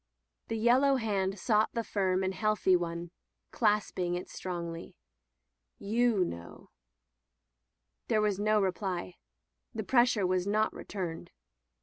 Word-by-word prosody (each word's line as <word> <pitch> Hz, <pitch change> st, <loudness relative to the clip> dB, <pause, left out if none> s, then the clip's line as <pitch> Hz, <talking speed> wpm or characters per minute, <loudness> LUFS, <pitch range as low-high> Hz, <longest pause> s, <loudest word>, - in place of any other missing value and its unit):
The 225 Hz, -, -2 dB
yellow 255 Hz, +5 st, +4 dB
hand 200 Hz, -5 st, -1 dB
sought 215 Hz, 0 st, +2 dB
the 230 Hz, -, -1 dB
firm 190 Hz, -3 st, 0 dB
and 190 Hz, 0 st, -1 dB
healthy 215 Hz, -2 st, +2 dB
one, 170 Hz, -1 st, -3 dB, 0.4 s
clasping 205 Hz, -5 st, +1 dB
it 180 Hz, -, -5 dB
strongly. 170 Hz, -2 st, -6 dB, 0.8 s
''You 220 Hz, -2 st, +2 dB
know/' 85 Hz, -, -9 dB, 1.4 s
There -, -, +2 dB
was 210 Hz, -2 st, +1 dB
no 215 Hz, +1 st, +3 dB
reply. 185 Hz, -, -2 dB, 0.6 s
The -, -, -2 dB
pressure 240 Hz, -5 st, +3 dB
was 185 Hz, +1 st, 0 dB
not 215 Hz, +1 st, +1 dB
returned. 175 Hz, -5 st, -6 dB
195 Hz, 115 wpm, -30 LUFS, 180-215 Hz, 1.4 s, yellow